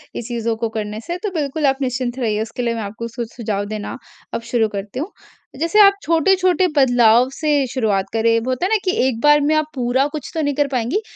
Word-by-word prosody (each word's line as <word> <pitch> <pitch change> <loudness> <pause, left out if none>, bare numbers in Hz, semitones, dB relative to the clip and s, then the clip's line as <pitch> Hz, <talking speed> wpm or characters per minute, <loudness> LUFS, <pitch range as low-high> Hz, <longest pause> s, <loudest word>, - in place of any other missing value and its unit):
इस 235 - -5
चीज़ों 230 -2 -2
को 230 0 -2
करने 215 -1 -4
से, 345 +1 -2
तो 415 +1 -3
बिल्कुल 300 -2 -2
आप 270 0 +1
निश्चिंत 250 -1 -2
रहिए 220 -3 0
उसके 230 +2 -5
लिए 235 -1 0
मैं 225 - -3
आपको 220 +3 -6
सु 235 +1 -5
सुझाव 210 -4 -2
देना 210 0 -5 0.4
अब - - -2
शुरू 230 -3 +2
करती 205 +4 -6
हूँ। 340 +8 -4 0.5
जैसे 335 +6 +2
आप 400 -1 +8
छोटे-छोटे 365 +3 +3
बदलाव 245 -3 +5
से 305 -1 -1 0.2
शुरुआत 210 -7 +1
करें, 230 0 +3
होता 255 +6 -1
है 380 - 0
ना 445 - +3
कि 370 - +2 0.2
एक 230 -3 -2
बार 295 0 +6
में 295 +2 +2
आप 310 0 +2
पूरा 255 +1 +1
कुछ 295 -2 -7
तो 320 - -1
नहीं 290 -1 0
कर 290 0 +1
पाएँगी 260 - -1
250 Hz, 225 wpm, -19 LUFS, 225-300 Hz, 0.5 s, आप